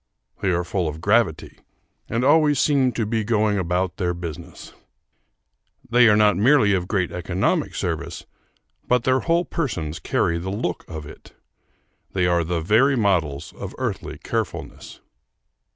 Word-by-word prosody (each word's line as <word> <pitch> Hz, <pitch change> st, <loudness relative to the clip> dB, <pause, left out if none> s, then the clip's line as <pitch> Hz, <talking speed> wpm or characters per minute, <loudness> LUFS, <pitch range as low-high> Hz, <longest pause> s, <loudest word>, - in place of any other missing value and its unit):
They 100 Hz, -, +1 dB
are 90 Hz, -1 st, +1 dB
full 90 Hz, -1 st, -2 dB
of 75 Hz, +1 st, -5 dB
gravity, 100 Hz, -2 st, +1 dB, 0.5 s
and 120 Hz, +2 st, 0 dB
always 150 Hz, -1 st, +4 dB
seem 135 Hz, -4 st, +3 dB
to 115 Hz, -, -1 dB
be 110 Hz, +1 st, -1 dB
going 105 Hz, -2 st, +1 dB
about 90 Hz, 0 st, -1 dB
their 90 Hz, -3 st, -1 dB
business. 85 Hz, -1 st, -8 dB, 1.1 s
They 120 Hz, 0 st, +5 dB
are 105 Hz, -, +5 dB
not 105 Hz, -1 st, +4 dB
merely 110 Hz, -1 st, +4 dB
of 90 Hz, -2 st, -1 dB
great 95 Hz, -5 st, -1 dB
economic 90 Hz, +1 st, -1 dB
service, -, -, -4 dB, 0.6 s
but 125 Hz, -1 st, +2 dB
their 130 Hz, +1 st, +2 dB
whole 170 Hz, +3 st, +1 dB
persons 85 Hz, -, -3 dB
carry 85 Hz, +3 st, 0 dB
the 90 Hz, +3 st, -5 dB
look 100 Hz, -3 st, -3 dB
of 80 Hz, -2 st, -7 dB
it. 75 Hz, -, -14 dB, 0.8 s
They 90 Hz, -2 st, +1 dB
are 85 Hz, -1 st, +2 dB
the 85 Hz, 0 st, -2 dB
very 115 Hz, -, +3 dB
models 90 Hz, -, 0 dB
of -, -, -8 dB
earthly -, -, -4 dB
carefulness. -, -, -5 dB
100 Hz, 150 wpm, -22 LUFS, 85-120 Hz, 1.1 s, They